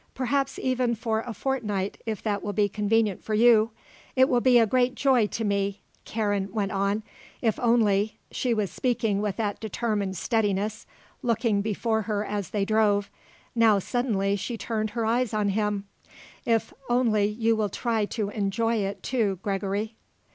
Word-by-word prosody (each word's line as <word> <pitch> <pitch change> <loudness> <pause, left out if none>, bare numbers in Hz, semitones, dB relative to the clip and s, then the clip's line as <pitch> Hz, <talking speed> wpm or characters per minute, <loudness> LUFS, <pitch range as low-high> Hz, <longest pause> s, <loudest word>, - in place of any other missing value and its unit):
Perhaps, 270 +2 0
even, 255 -2 0
for 220 0 -1
a 235 +2 -5
fortnight 210 -5 -2
if 220 -2 -3
that 205 -2 -1
will 205 - -3
be 205 +1 +3
convenient 210 0 0
for 215 - -1
you. 225 -1 +5 0.5
It 260 0 +5
will 245 -2 +3
be 250 -1 +5
a 230 - +6
great 250 +3 +2
joy 255 -6 +3
to 225 - -4
me," 200 0 -1 0.2
Karen 205 -3 -1
went 200 -1 -1
on, 200 +2 0 0.4
"if 225 -3 +1
only" 220 -3 +2
she 250 - -1
was 210 -4 0
speaking 225 -5 0
with 205 -3 -2
that 210 -3 -2
determined 210 -3 -2
steadiness, 210 0 -1 0.3
looking 230 -4 +1
before 220 +1 0
her 210 0 -2
as 205 -4 -3
they 205 -2 0
drove; 210 -1 +2 0.4
now, 225 -3 +5
suddenly, 200 -2 0
she 230 +4 -4
turned 215 -1 -2
her 230 - +1
eyes 230 0 +1
on 210 -1 +1
him 205 0 -1 0.6
"if 230 -1 +1 0.2
only 235 -4 +3
you 225 +2 +1
will 215 -2 0
try 225 +1 0
to 205 -1 -3
enjoy 225 +3 0
it, 200 -1 -3
too, 220 -7 0
Gregory." 200 +2 -2
215 Hz, 165 wpm, -26 LUFS, 205-230 Hz, 0.6 s, a